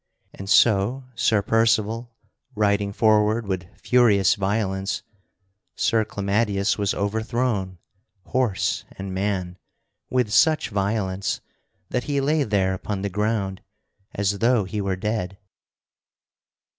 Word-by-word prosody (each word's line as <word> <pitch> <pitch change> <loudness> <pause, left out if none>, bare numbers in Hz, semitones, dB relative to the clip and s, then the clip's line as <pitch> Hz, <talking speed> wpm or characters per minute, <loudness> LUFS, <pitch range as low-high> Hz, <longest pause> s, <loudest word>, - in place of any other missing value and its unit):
And 95 0 -8
so, 110 +5 +4
Sir 110 -3 +2
Percival 115 +1 +1 0.4
riding 100 -1 +1
forward 110 +1 +2
with 95 -3 -3
furious 110 -6 +4
violence, 95 -1 -1 0.7
Sir 110 -1 +1
Clamadius 100 0 0
was 100 -1 -1
overthrown, 110 -2 -1 0.5
horse 125 -6 0
and 95 -1 -6
man, 95 -2 -2 0.5
with 125 -4 0
such 155 -5 +4
violence 100 -2 -1 0.5
that 125 - -1
he 145 -2 0
lay 150 +3 +1
there 100 -5 +1
upon 95 +1 -4
the 100 - -1
ground 100 -1 -1 0.5
as 100 0 0
though 115 -1 +3
he 100 +3 -4
were 100 -1 -1
dead. 95 -1 -3
105 Hz, 110 wpm, -23 LUFS, 95-115 Hz, 0.7 s, so